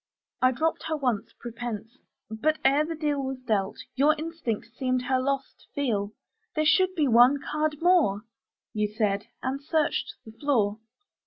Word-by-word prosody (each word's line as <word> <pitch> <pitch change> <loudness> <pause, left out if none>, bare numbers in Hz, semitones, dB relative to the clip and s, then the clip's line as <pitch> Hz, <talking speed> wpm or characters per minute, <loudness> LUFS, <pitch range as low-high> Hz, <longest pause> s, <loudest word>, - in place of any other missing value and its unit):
I 255 0 +5
dropped 320 +6 -1
her 315 -1 -1
once, 250 -7 -1
prepense; 235 0 -6 0.3
but, 305 +8 +1
ere 280 +3 +5
the 325 +1 -4
deal 295 -2 -1
Was 265 0 -3
dealt, 210 -5 -1 0.2
your 295 +3 +4
instinct 310 -9 -4
seemed 255 -1 0
her 260 +1 +1
loss 275 0 -1
to - - -25
feel: 215 -7 -1 0.4
'There 310 0 +1
should 370 +4 +4
be 305 -5 +2
one 245 +3 +6
card 305 +1 -1
more,' 320 - +4 0.5
You 210 -1 +1
said, 210 -2 0 0.2
and 265 +2 -2
searched 310 0 0
the 220 - -10
floor. 225 -5 0
265 Hz, 160 wpm, -27 LUFS, 225-305 Hz, 0.5 s, one